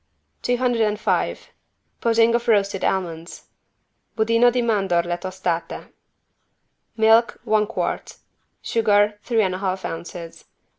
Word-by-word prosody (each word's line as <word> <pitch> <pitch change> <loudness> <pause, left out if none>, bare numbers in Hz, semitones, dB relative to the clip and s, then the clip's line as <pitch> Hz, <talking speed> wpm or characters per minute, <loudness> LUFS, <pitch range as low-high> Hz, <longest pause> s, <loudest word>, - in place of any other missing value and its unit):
205 240 -4 0 0.5
PUDDING 230 0 +3
OF 235 0 -1
ROASTED 200 -3 +2
ALMONDS 170 -3 -3 0.7
(Budino 230 +2 +4
di 245 0 0
mandorle 185 -6 +1
tostate) 180 -3 -4 1.0
Milk, 225 +1 +4
one 215 -1 +1
quart. 230 - -4 0.5
Sugar, 210 -2 +2
three 230 -3 +1
and 185 -2 0
a 185 - -4
half 190 -1 -3
ounces. 165 0 -8
210 Hz, 100 wpm, -22 LUFS, 185-230 Hz, 1.0 s, Budino